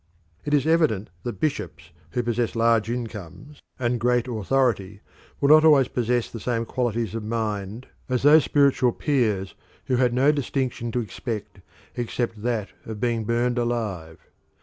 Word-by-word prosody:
It 145 0 +2
is 140 -1 +1
evident 155 - +2
that 120 - -6
bishops 155 -1 -3 0.2
who 125 - -2
possess 120 -1 -1
large 115 -1 +2
incomes 120 - -7 0.2
and 120 -1 -1
great 125 +1 +1
authority 110 -4 0 0.4
will 140 - +2
not 155 +1 +8
always 145 -5 +5
possess 120 -1 0
the 115 - -8
same 115 +1 -1
qualities 115 -4 -2
of 115 - -3
mind 110 0 -3 0.2
as 130 0 0
those 150 +1 +7
spiritual 140 -4 +3
peers 110 -10 0 0.3
who 130 - +1
had 125 -1 +3
no 135 +4 +4
distinction 130 -4 -2
to 125 - +1
expect 105 -1 -6 0.4
except 120 -2 -3
that 115 -3 -1
of 110 -2 -7
being 115 -2 -1
burnt 120 +2 0
alive. 105 -9 -3
120 Hz, 150 wpm, -24 LUFS, 110-130 Hz, 0.4 s, not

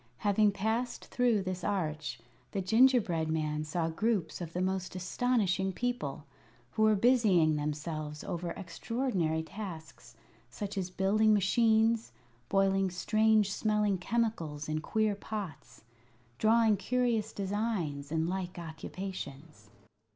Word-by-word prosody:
Having 205 0 +3
passed 220 +5 -2
through 240 -5 +1
this 185 -1 -4
arch, 155 -10 -2 0.4
the 195 - -1
gingerbread 220 -7 +3
man 155 -1 -1
saw 160 +2 -1
groups 185 -1 -1
of 165 -2 -5
the 175 - -3
most 185 0 -2
astonishing 190 -1 0
people, 180 - -3 0.5
who - - -2
were 215 0 +5
busying 200 -9 +4
themselves 150 0 -4
over 170 0 -4
extraordinary 185 -4 -2
tasks, 170 -3 -9 0.3
such 205 -1 -5
as 185 -2 -2
building 210 +4 +3
machines, 225 +3 +3 0.4
boiling 195 -1 +2
strange 215 +2 +2
smelling 210 -3 +1
chemicals 180 -8 -1
in 155 0 -2
queer 215 +5 +1
pots, 195 - -7 0.6
drawing 220 -1 +4
curious 235 0 0
designs, 190 -8 -2
and 160 0 0
like 180 0 -3
occupations. 160 - -7
190 Hz, 115 wpm, -31 LUFS, 160-220 Hz, 0.6 s, were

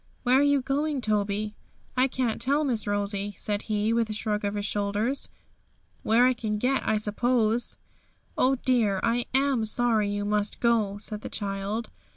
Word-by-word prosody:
'Where 255 +1 +4
are - - +4
you 285 -2 +3
going, 290 +2 0
Toby?' 210 -2 -1 0.4
'I 255 +1 +4
can't 250 -4 -2
tell, 280 +5 +2
Miss 235 -8 0
Rosie,' 205 0 -2
said 205 -1 -2
he, 215 +1 +1
with 230 -1 +1
a - - -2
shrug 210 -1 -2
of 205 0 -1
his 205 0 -2
shoulders; 210 +6 -1 0.7
'where 230 +3 +4
I 255 - +4
can 220 -3 -3
get, 255 +5 +1
I 215 - +3
suppose.' 225 +2 0 0.6
'Oh 265 +1 +3
dear! 235 -7 +1
I 235 +1 +1
am 270 -3 +2
sorry 220 -1 +1
you 205 0 -2
must 210 0 0
go!' 220 -4 +2
said 210 0 -7
the - - -6
child. 200 +2 -3
220 Hz, 175 wpm, -27 LUFS, 205-250 Hz, 0.7 s, Where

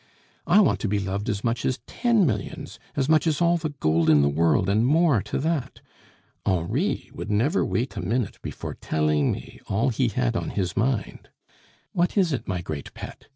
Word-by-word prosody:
"I 210 - +6
want 195 - +2
to - - -2
be 105 +1 +1
loved 100 +3 -2
as 100 -2 -2
much 115 -1 -1
as 130 - 0
ten 235 -6 +2
millions, 110 -8 -3 0.2
as 135 -1 0
much 155 0 +3
as 155 -2 +1
all 175 0 +3
the 160 -2 -3
gold 80 - +1
in 75 -2 +6
the 70 - +3
world, 80 +5 +2
and 105 +3 +2
more 150 - +3
to - - -4
that. 155 -4 -2 0.6
Henri 100 - -1
would - - -6
never 120 - +2
wait 125 +4 -2
a - - -3
minute 110 +3 -2
before - - -6
telling 75 -2 +1
me - - -7
all 110 +7 +1
he 125 +1 +1
had 120 +1 0
on - - -2
his 95 -3 -2
mind. 115 -3 -1 0.6
What 175 +4 0
is 180 -6 +3
it, 130 - -4
my 90 -2 -2
great 75 -4 -6
pet? - - -9
115 Hz, 200 wpm, -25 LUFS, 95-150 Hz, 0.6 s, I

